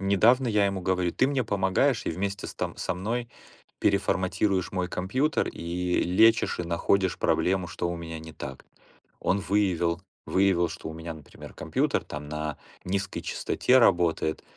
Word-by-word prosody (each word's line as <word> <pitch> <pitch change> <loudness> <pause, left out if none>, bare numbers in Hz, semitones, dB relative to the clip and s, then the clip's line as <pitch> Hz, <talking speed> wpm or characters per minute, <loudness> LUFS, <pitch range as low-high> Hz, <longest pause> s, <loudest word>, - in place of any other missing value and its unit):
Недавно 110 +6 +4
я 105 -2 +3
ему 100 -1 -2
говорю: 90 -1 0
"Ты 130 - +2
мне 135 -3 0
помогаешь 100 +6 +1
и - - +1
вместе 100 +4 -3
с - - -9
там - - -3
со - - -2
мной 115 +6 -3 0.5
переформатируешь 95 -1 +1
мой 90 -1 -1
компьютер, 130 - 0
и 90 +1 -1
лечишь, 110 +6 +4
и 90 - -1
находишь 90 +2 +1
проблему, 90 -1 +1
что 80 +3 -3
у 85 - -3
меня 80 -1 -6
не 80 0 -10
так". 65 -3 -8 0.6
Он 100 - +1
выявил 90 -3 +1 0.2
выявил, 95 -3 +2
что - - -7
у - - -7
меня, 80 0 -6
например, 75 -4 -12
компьютер, - - 0
там, 75 0 -7
на 75 -1 -3 0.3
низкой 100 +1 -2
частоте 130 +1 +2
работает, 85 -7 +2
95 Hz, 160 wpm, -27 LUFS, 85-100 Hz, 0.6 s, Недавно